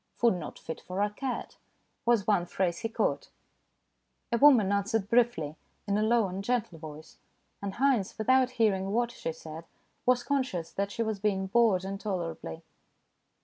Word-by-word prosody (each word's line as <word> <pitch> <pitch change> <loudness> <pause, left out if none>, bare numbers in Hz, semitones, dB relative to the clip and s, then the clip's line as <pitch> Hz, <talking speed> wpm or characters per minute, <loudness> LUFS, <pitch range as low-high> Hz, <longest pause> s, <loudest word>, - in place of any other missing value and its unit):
"Food 235 -3 +3
not 175 -4 -6
fit 160 - -7
for 185 +1 -5
a 205 - 0
cat/' 255 +4 -4 0.5
was 235 -4 +4
one 190 -5 +2
phrase 175 -1 -1
he 225 - -3
caught. - - -1 1.0
A 235 - +3
woman 250 -9 +6
answered 200 +1 0
briefly, 230 -10 +2 0.3
in 200 - +1
a 210 - +2
low 225 -1 +3
and 190 +2 -5
gentle 215 -7 -1
voice, 155 0 -10 0.4
and 200 -1 -4
Haynes, 255 -7 +1
without 255 +4 +3
hearing 195 -3 +2
what 240 +1 +1
she 165 - -4
said, 160 0 -9 0.4
was 250 -1 +4
conscious 255 - -1
that 200 0 -2
she 230 - -1
was 220 -2 -2
being 195 -2 0
bored 200 -2 +3
intolerably. 180 - -4
200 Hz, 160 wpm, -29 LUFS, 185-235 Hz, 1.0 s, woman